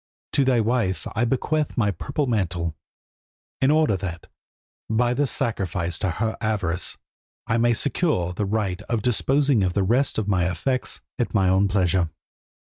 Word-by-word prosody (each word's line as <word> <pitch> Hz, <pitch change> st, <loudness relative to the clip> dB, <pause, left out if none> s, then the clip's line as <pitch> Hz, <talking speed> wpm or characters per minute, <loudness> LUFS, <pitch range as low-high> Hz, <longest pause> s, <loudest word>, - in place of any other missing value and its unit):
To 140 Hz, -, +4 dB
thy 130 Hz, -2 st, +3 dB
wife 110 Hz, -7 st, 0 dB
I 110 Hz, +3 st, +2 dB
bequeath 145 Hz, +5 st, 0 dB
my 105 Hz, -4 st, +2 dB
purple 140 Hz, -, -2 dB
mantle, 90 Hz, -, -1 dB, 0.9 s
in 135 Hz, -, +4 dB
order 155 Hz, -7 st, +3 dB
that, 90 Hz, -3 st, -5 dB, 0.6 s
by 120 Hz, +2 st, +2 dB
this 140 Hz, +1 st, +1 dB
sacrifice 90 Hz, -6 st, -2 dB
to 95 Hz, -, 0 dB
her 110 Hz, +6 st, -1 dB
avarice, 100 Hz, -6 st, -1 dB, 0.5 s
I 115 Hz, -, +1 dB
may 120 Hz, +1 st, +3 dB
secure 120 Hz, -, +1 dB
the 105 Hz, +3 st, -2 dB
right 100 Hz, -3 st, -1 dB
of 115 Hz, -3 st, 0 dB
disposing 135 Hz, +1 st, +2 dB
of 90 Hz, -2 st, +1 dB
the 100 Hz, -, +1 dB
rest 125 Hz, +8 st, +2 dB
of 110 Hz, -, -1 dB
my 90 Hz, -3 st, +2 dB
effects 125 Hz, +10 st, -2 dB, 0.2 s
at 120 Hz, -, -1 dB
my 95 Hz, -3 st, +4 dB
own 95 Hz, +2 st, +4 dB
pleasure. 95 Hz, -3 st, +1 dB
110 Hz, 160 wpm, -24 LUFS, 95-125 Hz, 0.9 s, To